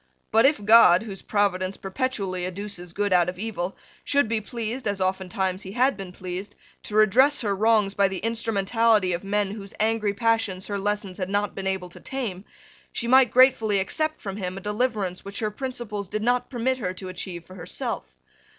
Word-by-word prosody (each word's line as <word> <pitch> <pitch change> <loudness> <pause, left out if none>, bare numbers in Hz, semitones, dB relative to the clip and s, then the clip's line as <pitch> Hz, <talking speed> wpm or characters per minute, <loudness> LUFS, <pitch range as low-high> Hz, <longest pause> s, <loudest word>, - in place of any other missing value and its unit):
But, 225 +4 +6
if 275 -8 0
God, 215 -4 +7
whose 195 -4 -7
providence 195 -2 0
perpetually 195 -4 -2
educes 185 -1 -5
good 205 +1 0
out 180 -1 +4
of 180 - -6
evil, 195 -3 -4 0.3
should 285 -4 +2
be 225 0 -1
pleased, 230 +2 -4
as 200 -1 -1
oftentimes 190 0 -1
He 195 +2 -8
bad 255 +1 +3
been 195 -2 -8
pleased, 185 +3 -6 0.3
to 210 - -6
redress 245 +7 +5
her 205 -4 0
wrongs 210 -1 +3
by 200 -1 +3
the 190 0 -4
instrumentality 225 -2 +1
of 170 - -3
men 200 0 0
whose 200 -2 -8
angry 215 -2 +1
passions 225 -4 +1
her 205 -1 -3
lessons 205 -2 -2
had 185 0 -2
not 205 0 0
been 190 0 -4
able 190 -2 -2
to - - -12
tame, 220 -8 -5 0.5
she 235 - -3
might 260 0 +6
gratefully 230 -5 +4
accept 310 +10 -1
from 195 -1 -5
Him 185 -2 -4
a - - -6
deliverance 210 -3 -1
which 200 0 -7
her 215 -1 -1
principles 215 -5 -5
did 215 0 -2
not 245 +1 +1
permit 260 +1 -1
her 185 -5 -3
to 185 - -7
achieve 180 -2 -6
for 185 - -13
herself. 65 - -5
205 Hz, 190 wpm, -25 LUFS, 190-225 Hz, 0.5 s, God